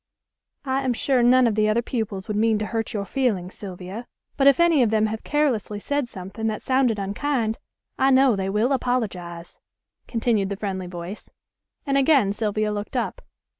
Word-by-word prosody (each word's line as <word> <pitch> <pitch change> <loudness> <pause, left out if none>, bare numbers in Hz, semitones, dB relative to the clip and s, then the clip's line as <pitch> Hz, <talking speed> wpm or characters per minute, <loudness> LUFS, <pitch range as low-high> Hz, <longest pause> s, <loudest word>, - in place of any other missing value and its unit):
"I 265 0 0
am 260 -2 0
sure 255 +2 +1
none 250 +1 +5
of 230 - +2
the 215 0 +2
other 230 +3 +1
pupils 220 -6 -3
would 210 - -2
mean 220 +1 +3
to 210 - -2
hurt 225 0 -3
your 205 -4 -3
feelings, 205 -8 -1
Sylvia. 190 +4 -8 0.3
But 275 -1 +3
if 280 +1 +6
any 340 -4 +5
of 235 - +3
them 220 0 +2
have 220 0 -3
carelessly 265 -9 0
said 285 +4 -2
something 195 +4 -5
that 215 -1 -3
sounded 260 -4 +2
unkind, 220 +3 -1 0.4
I 265 - +4
know 265 -3 +5
they 190 0 -2
will 215 +6 +1
apologize," 190 -10 -2 0.5
continued 225 -4 0
the 200 - -2
friendly 190 -3 -4
voice; 175 +3 -8 0.6
and 275 -1 +2
again 265 -8 +4
Sylvia 215 0 -1
looked 205 0 -4
up. - - -2
220 Hz, 180 wpm, -24 LUFS, 200-255 Hz, 0.6 s, if